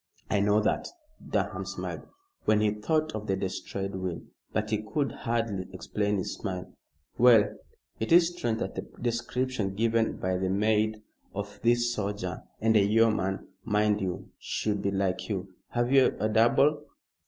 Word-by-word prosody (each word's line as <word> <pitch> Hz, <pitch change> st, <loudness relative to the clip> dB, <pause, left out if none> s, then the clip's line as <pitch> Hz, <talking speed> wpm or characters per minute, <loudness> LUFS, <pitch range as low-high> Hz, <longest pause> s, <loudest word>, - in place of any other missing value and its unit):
"I 105 Hz, -, +3 dB
know 105 Hz, +1 st, +4 dB
that." 105 Hz, -, 0 dB, 0.4 s
Durham -, -, -1 dB
smiled -, -, -5 dB, 0.4 s
when 110 Hz, -, +4 dB
he 105 Hz, -1 st, +3 dB
thought 155 Hz, +9 st, 0 dB
of 105 Hz, 0 st, -5 dB
the 95 Hz, -, +1 dB
destroyed 95 Hz, +1 st, -4 dB
will; 95 Hz, -2 st, -4 dB, 0.3 s
but 110 Hz, 0 st, -1 dB
he 105 Hz, -1 st, +1 dB
could 135 Hz, +7 st, -1 dB
hardly 115 Hz, -5 st, -2 dB
explain 105 Hz, +2 st, -1 dB
his 95 Hz, -, -2 dB
smile. 90 Hz, -3 st, -5 dB, 0.5 s
"Well, 115 Hz, -4 st, +6 dB, 0.4 s
it 110 Hz, -, -2 dB
is 170 Hz, 0 st, +7 dB
strange 120 Hz, -9 st, -1 dB
that -, -, -2 dB
the -, -, -3 dB, 0.2 s
description 120 Hz, -3 st, -1 dB
given 115 Hz, +1 st, +1 dB
by 95 Hz, 0 st, -1 dB
the 95 Hz, 0 st, 0 dB
maid 110 Hz, +2 st, +1 dB, 0.3 s
of 100 Hz, 0 st, -5 dB
this 120 Hz, +1 st, +3 dB
soldier 100 Hz, -4 st, -3 dB, 0.2 s
and 110 Hz, 0 st, +3 dB
a 105 Hz, -, +6 dB
yeoman, 105 Hz, -2 st, +2 dB, 0.2 s
mind 105 Hz, -1 st, +2 dB
you 90 Hz, -2 st, -4 dB
should 105 Hz, -2 st, -1 dB
be 100 Hz, -, 0 dB
like 95 Hz, -2 st, -1 dB
you. 95 Hz, -2 st, -3 dB, 0.2 s
Have 120 Hz, +1 st, 0 dB
you 135 Hz, -1 st, +5 dB
a 110 Hz, -, +2 dB
double?" 135 Hz, +7 st, +4 dB
105 Hz, 160 wpm, -28 LUFS, 100-115 Hz, 0.5 s, is